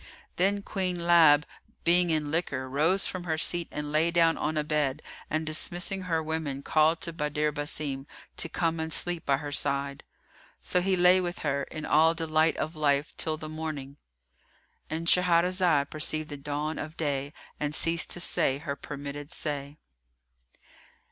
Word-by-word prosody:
Then 200 Hz, +2 st, +2 dB
Queen 180 Hz, -4 st, -2 dB
Lab, 160 Hz, -4 st, +6 dB, 0.4 s
being 175 Hz, +1 st, +4 dB
in 155 Hz, -2 st, 0 dB
liquor, 140 Hz, -5 st, -2 dB
rose 160 Hz, +9 st, +2 dB
from 180 Hz, -1 st, -3 dB
her 160 Hz, -2 st, -1 dB
seat 170 Hz, +2 st, +2 dB
and 150 Hz, 0 st, -5 dB
lay 155 Hz, +2 st, +3 dB
down 165 Hz, -1 st, +3 dB
on 155 Hz, 0 st, -2 dB
a 150 Hz, -, +1 dB
bed 150 Hz, -1 st, -1 dB, 0.3 s
and 155 Hz, +1 st, -1 dB
dismissing 175 Hz, +5 st, 0 dB
her 165 Hz, -3 st, -1 dB
women 155 Hz, -3 st, -3 dB
called 155 Hz, +2 st, +3 dB
to 170 Hz, -, -4 dB
Badr 150 Hz, -1 st, -1 dB
Basim 145 Hz, -2 st, -3 dB, 0.3 s
to 165 Hz, -, -2 dB
come 165 Hz, 0 st, -1 dB
and 160 Hz, 0 st, -3 dB
sleep 175 Hz, 0 st, -1 dB
by 140 Hz, -1 st, +3 dB
her 145 Hz, 0 st, -6 dB
side. 140 Hz, 0 st, -1 dB, 0.6 s
So 180 Hz, -, +2 dB
he 190 Hz, +1 st, +1 dB
lay 180 Hz, +1 st, +5 dB
with 175 Hz, -1 st, -4 dB
her, 140 Hz, -1 st, 0 dB
in 155 Hz, -, -7 dB
all 160 Hz, +2 st, +4 dB
delight 160 Hz, -1 st, +1 dB
of 155 Hz, +2 st, -3 dB
life 145 Hz, -1 st, +1 dB
till 155 Hz, -1 st, -1 dB
the 155 Hz, -, -7 dB
morning.——And 140 Hz, -, -9 dB
Shahrazad 175 Hz, -3 st, +3 dB
perceived 155 Hz, 0 st, -1 dB
the 145 Hz, -, -5 dB
dawn 150 Hz, +2 st, -3 dB
of 155 Hz, +2 st, -7 dB
day 140 Hz, -2 st, -2 dB, 0.3 s
and 150 Hz, 0 st, -1 dB
ceased 165 Hz, 0 st, +2 dB
to -, -, -4 dB
say 135 Hz, -5 st, +1 dB
her 140 Hz, -1 st, -5 dB
permitted 145 Hz, +1 st, -7 dB
say. 145 Hz, -2 st, -4 dB
155 Hz, 160 wpm, -28 LUFS, 145-170 Hz, 0.6 s, Lab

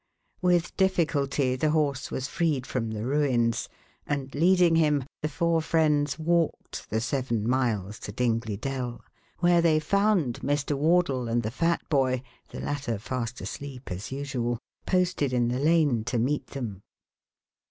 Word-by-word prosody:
With 175 Hz, -2 st, +2 dB
difficulty 145 Hz, -8 st, +1 dB
the 155 Hz, +4 st, +1 dB
horse 145 Hz, -4 st, 0 dB
was 130 Hz, -, -3 dB
freed 150 Hz, -5 st, 0 dB
from 115 Hz, -4 st, -2 dB
the 110 Hz, 0 st, -4 dB
ruins 120 Hz, -5 st, +1 dB, 0.4 s
and, 140 Hz, -2 st, -2 dB
leading 175 Hz, +1 st, +4 dB
him, 150 Hz, -4 st, +3 dB, 0.2 s
the 155 Hz, -, 0 dB
four 165 Hz, +2 st, +1 dB
friends 150 Hz, -3 st, +2 dB
walked 165 Hz, 0 st, -1 dB
the 110 Hz, -, 0 dB
seven 120 Hz, -3 st, -1 dB
miles 110 Hz, -6 st, 0 dB
to -, -, -6 dB
Dingley 115 Hz, -2 st, -1 dB
Dell, 125 Hz, -1 st, -4 dB, 0.4 s
where 175 Hz, -1 st, +5 dB
they 160 Hz, -2 st, +4 dB
found 190 Hz, -, +1 dB
Mr. 145 Hz, 0 st, 0 dB
Wardle 145 Hz, -4 st, +2 dB
and 115 Hz, +1 st, 0 dB
the 110 Hz, -, -2 dB
fat 165 Hz, +6 st, 0 dB
boy, 130 Hz, -3 st, +1 dB, 0.3 s
the -, -, -8 dB
latter 135 Hz, -6 st, -2 dB
fast 120 Hz, +2 st, -4 dB
asleep 135 Hz, -5 st, -7 dB
as 95 Hz, +7 st, -5 dB
usual, 130 Hz, -4 st, -2 dB, 0.3 s
posted 180 Hz, -7 st, +1 dB
in 120 Hz, -1 st, +2 dB
the 125 Hz, +1 st, -1 dB
lane 150 Hz, -6 st, +3 dB
to 125 Hz, 0 st, -1 dB
meet 135 Hz, +6 st, 0 dB
them. 110 Hz, -8 st, -6 dB
140 Hz, 150 wpm, -27 LUFS, 120-160 Hz, 0.4 s, where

